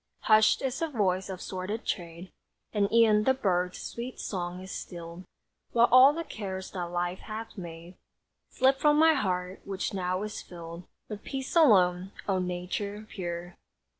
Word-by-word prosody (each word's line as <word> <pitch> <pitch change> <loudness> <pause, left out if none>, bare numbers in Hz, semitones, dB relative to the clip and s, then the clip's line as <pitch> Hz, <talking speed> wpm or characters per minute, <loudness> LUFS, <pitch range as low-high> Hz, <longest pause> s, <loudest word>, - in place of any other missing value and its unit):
Hushed 215 +3 +4
is 265 0 -1
the 330 - 0
voice 195 - 0
of 185 -1 -6
sordid 190 +4 -4
trade, 170 +1 -4 0.4
And 200 -2 +1
e'en 220 -2 +5
the 265 - +4
birds' 180 -7 0
sweet 240 +2 -6
song 180 -2 -4
is 190 0 -9
stilled; 170 +1 -7 0.5
While 235 0 +5
all 255 +3 +9
the 335 +3 -4
cares 190 -8 -6
that 180 -2 -4
Life 175 +1 -2
hath 220 +1 -7
made 170 -2 -9 0.6
Slip 265 +1 +3
from 295 0 +4
my 320 +1 +6
heart, 185 -8 -2
which 195 0 -3
now 185 0 -1
is 215 0 -5
filled 170 0 -9 0.2
With 210 -1 -7
peace 265 +1 -5
alone. 190 - +4
O 190 -2 +1
Nature 180 +4 -3
pure! 175 -2 -5
190 Hz, 160 wpm, -29 LUFS, 180-225 Hz, 0.6 s, all